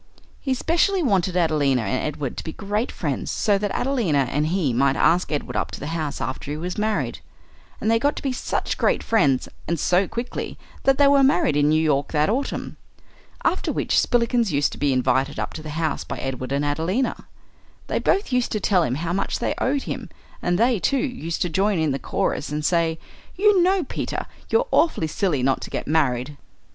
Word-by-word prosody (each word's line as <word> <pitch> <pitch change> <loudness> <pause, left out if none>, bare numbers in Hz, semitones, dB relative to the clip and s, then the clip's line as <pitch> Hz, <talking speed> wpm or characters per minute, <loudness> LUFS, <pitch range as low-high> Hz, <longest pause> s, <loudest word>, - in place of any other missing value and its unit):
He 265 -2 -1
specially 345 +7 +1
wanted 190 - +1
Adelina 145 -7 +2
and 110 +5 -1
Edward 145 -4 -4
to - - -4
be 160 - -6
great 210 +4 -2
friends, - - -3
so 205 -2 +1
that 205 0 -1
Adelina 190 - +1
and 150 +2 +1
he 165 -7 0
might 135 +3 +2
ask 175 +4 +2
Edward 150 - -3
up - - -1
to - - -7
the 150 +3 -5
house 155 -3 -3
after 130 +1 -4
he 150 - -3
was 180 +3 -4
married. 215 0 -1 0.6
And 220 - +1
they 230 - +4
got 285 +5 +1
to - - -7
be 270 -2 0
such - - -2
great - - +2
friends, 140 - +2 0.2
and 170 -1 -1
so 180 +5 +2
quickly, 235 +1 -5 0.3
that 270 -1 +4
they 285 - +6
were 280 0 +5
married 180 - +3
in 145 0 +3
New 155 +1 +3
York 150 -2 +1
that 150 +5 +2
autumn. 275 +4 -3 0.7
After - - +1
which - - +1
Spillikins 235 -3 +2
used 145 -1 +1
to - - -9
be 145 -1 +2
invited 130 +1 +1
up - - -3
to 155 - -7
the 155 - -8
house 160 +1 -2
by - - -6
Edward 130 -1 -4
and 140 +1 0
Adelina. 165 - -1 0.6
They - - -1
both 395 -6 +1
used 250 -1 +1
to 215 - 0
tell 190 -2 +3
him 125 -6 0
how 170 +4 -2
much 195 - -1
they - - -1
owed 275 +1 0
him; - - -5 0.3
and 175 0 +1
they, 235 0 +3
too, 275 - +1
used 250 - -2
to - - 0
join 195 +4 +1
in 160 -2 +1
the 135 - -2
chorus 150 - -2
and 150 +1 -3
say, 165 -2 +2 0.4
"You 405 -1 +4
know, 370 +1 +3
Peter, - - -4 0.2
you're - - +2
awfully 320 - +3
silly 155 -4 0
not 135 0 +1
to - - -6
get - - -4
married." 140 -2 0
170 Hz, 210 wpm, -23 LUFS, 145-240 Hz, 0.7 s, they